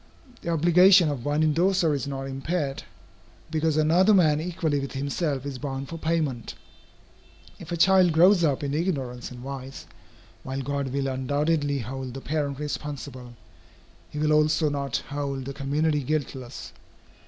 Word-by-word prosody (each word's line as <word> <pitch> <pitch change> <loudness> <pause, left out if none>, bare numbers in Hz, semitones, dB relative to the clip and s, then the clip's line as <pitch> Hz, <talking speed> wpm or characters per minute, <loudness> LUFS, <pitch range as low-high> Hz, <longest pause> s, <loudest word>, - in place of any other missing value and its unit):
The - - -5
obligation 175 +2 +6
of 135 -5 -4
one 145 +2 +1
indorser 170 +1 +2
is 140 0 -2
not 135 -1 -4
impaired, 135 +2 -3 0.7
because 160 -1 +1
another 175 +7 +4
man 155 -5 +4
equally 165 -4 -1
with 140 0 -5
himself 140 0 -2
is 135 -2 -5
bound 135 -1 -5
for 165 - -6
payment 155 -7 -2 1.0
If 170 0 -10
a 170 - -1
child 185 0 +5
grows 175 +3 +5
up 145 -3 +1
in 140 0 -2
ignorance 135 -7 -2
and 125 -1 -10
vice, 135 -2 -7 0.6
while 135 +1 -4
God 140 0 -2
will 135 +1 -2
undoubtedly 145 +3 0
hold 130 +1 -5
the 135 - -6
parent 145 -2 -2
responsible, 140 -4 -6 0.7
he - - -9
will 155 0 +2
also 155 +1 +3
not 140 -3 -2
hold 140 -2 -3
the 140 - -5
community 145 +2 0
guiltless. 135 -3 -4
145 Hz, 150 wpm, -26 LUFS, 135-160 Hz, 1.0 s, obligation